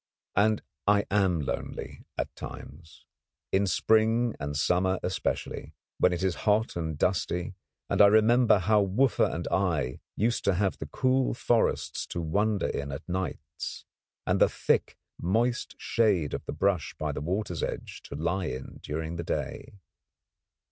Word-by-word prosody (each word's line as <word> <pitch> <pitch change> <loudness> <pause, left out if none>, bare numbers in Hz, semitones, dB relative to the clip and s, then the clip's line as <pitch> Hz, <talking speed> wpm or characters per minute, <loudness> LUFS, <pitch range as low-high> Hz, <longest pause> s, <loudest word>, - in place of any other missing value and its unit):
And 105 +1 +3 0.2
I 100 0 +4
am 95 -5 +2
lonely 70 - -5
at - - -3
times 80 +3 -10 0.5
in 100 +1 +2
spring 110 +5 +3
and 70 0 -3
summer 90 +5 +2
especially, 90 - -3 0.2
when 90 - +5
it 90 +1 -2
is 95 -2 0
hot 110 +2 +2
and 80 -3 -3
dusty, 90 0 0 0.3
and - - +2
I 100 - +10
remember 110 +2 +5
how 105 +2 +3
Wooffa 115 +7 +2
and - - -4
I 80 -10 0 0.2
used 115 +3 +1
to 100 - +3
have 95 +1 0
the 75 - -5
cool 130 - +1
forests 120 -1 +1
to - - -4
wander 100 +6 +1
in 70 0 -3
at 70 - -7
nights, 95 +1 -4 0.4
and - - +1
the - - +6
thick, - - 0 0.2
moist 115 +7 0
shade 100 -10 +1
of - - -4
the - - -4
brush 95 -5 0
by - - -2
the - - -4
water's 90 0 -2
edge - - -4
to - - -7
lie 85 +5 -1
in 65 -4 -6
during 80 +2 -4
the 85 - -3
day. 85 - -4
95 Hz, 155 wpm, -28 LUFS, 85-110 Hz, 0.5 s, I